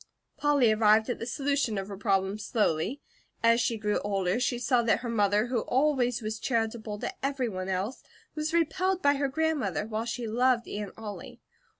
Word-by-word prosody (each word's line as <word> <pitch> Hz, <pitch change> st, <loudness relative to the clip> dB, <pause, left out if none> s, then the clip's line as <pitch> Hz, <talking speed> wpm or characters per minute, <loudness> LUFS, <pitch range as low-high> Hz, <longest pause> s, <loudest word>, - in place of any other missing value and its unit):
Polly 285 Hz, -6 st, +3 dB
arrived 215 Hz, +2 st, +4 dB
at -, -, -4 dB
the 230 Hz, -, -5 dB
solution 280 Hz, -5 st, 0 dB
of 195 Hz, 0 st, -3 dB
her 200 Hz, -, -6 dB
problem 195 Hz, 0 st, 0 dB
slowly. 210 Hz, -, 0 dB, 0.4 s
As 230 Hz, +1 st, +5 dB
she 230 Hz, -1 st, 0 dB
grew 210 Hz, -1 st, 0 dB
older, 195 Hz, 0 st, 0 dB
she 250 Hz, -1 st, 0 dB
saw 245 Hz, 0 st, +2 dB
that 230 Hz, -1 st, +2 dB
her 245 Hz, -, -4 dB
mother, 210 Hz, -1 st, +2 dB
who 245 Hz, -1 st, -1 dB
always 250 Hz, -2 st, +1 dB
was 215 Hz, 0 st, -3 dB
charitable 225 Hz, -3 st, -2 dB
to -, -, -3 dB
everyone 240 Hz, -9 st, -2 dB
else, 190 Hz, +7 st, -2 dB, 0.3 s
was 305 Hz, 0 st, -2 dB
repelled 340 Hz, +3 st, +1 dB
by 285 Hz, 0 st, +5 dB
her 280 Hz, 0 st, 0 dB
grandmother, 285 Hz, -9 st, -1 dB
while 220 Hz, +1 st, -3 dB
she 240 Hz, 0 st, -3 dB
loved 240 Hz, +2 st, +2 dB
Aunt 205 Hz, -1 st, -5 dB
Ollie. 210 Hz, -2 st, -8 dB
230 Hz, 180 wpm, -28 LUFS, 210-265 Hz, 0.4 s, As